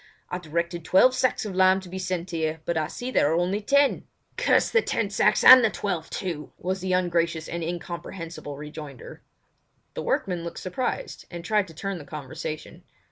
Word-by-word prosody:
I 180 - -2
directed 170 +1 -3
twelve 190 +10 +5
sacks 255 -3 +1
of 205 - -4
lime 185 0 +5
to 185 - -11
be 185 +2 -6
sent 185 -1 -3
here, 160 -1 -1
but 170 - -1
I 155 -1 0
see 250 +1 -6
there 145 - +3
are - - +2
only 185 +4 0
ten." 280 +5 +2 0.3
"Damn - - +4
the 465 - +5
ten - - -1
sacks - - +3
and 255 -1 +11
the 225 - +4
twelve 180 -7 -3
too!" 165 -5 -4
was 185 +1 -3
the 185 0 -2
ungracious 170 -3 0
and 170 0 -4
incomprehensible 170 -2 -6
rejoinder. 150 -3 -9 0.7
The - - -4
workman 180 -3 -1
looked 170 0 -6
surprised, 255 - -4
and 170 -1 -8
tried 210 -1 +2
to 165 - -14
turn 195 +2 -4
the 145 - -10
conversation. 150 +1 -7
175 Hz, 190 wpm, -26 LUFS, 160-190 Hz, 0.7 s, and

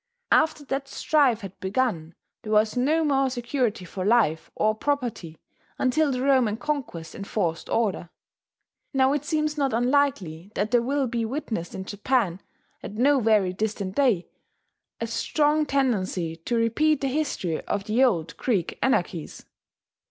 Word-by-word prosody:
After 310 -2 +3
that 275 +1 -3
strife 275 -6 +2
had 195 -2 -9
begun 190 -6 -1 0.3
there 215 - -6
was 215 +1 +3
no 300 +6 +2
more 270 -2 +2
security 240 -5 -2
for 185 +2 -5
life 205 -7 +2
or 215 0 +2
property 230 - -3 0.4
until 280 +3 +2
the 255 0 -2
Roman 255 -6 +3
conquest 250 - -4
enforced 190 -4 -3
order.... 200 -7 0 0.9
Now 265 +1 +4
it 295 0 -2
seems 305 -1 -1
not 275 -3 +1
unlikely 230 - 0
that 210 +3 -1
there 240 -1 +4
will 275 +2 0
he 235 -1 0
witnessed 225 - -4
in 190 - -5
Japan, 205 -3 0 0.4
at 205 - -8
no 275 +5 +4
very 210 -5 +3
distant 200 -1 -3
day, 240 -11 +2 0.7
a 230 - -2
strong 295 +6 +1
tendency 195 -12 0
to 170 +9 -3
repeat 265 +6 +2
the 275 - 0
history 260 - -2
of 205 -1 -2
the 220 +5 +2
old 175 -11 +1
Greek 200 -9 -1
anarchies. 175 - -1
235 Hz, 145 wpm, -25 LUFS, 195-275 Hz, 0.9 s, Now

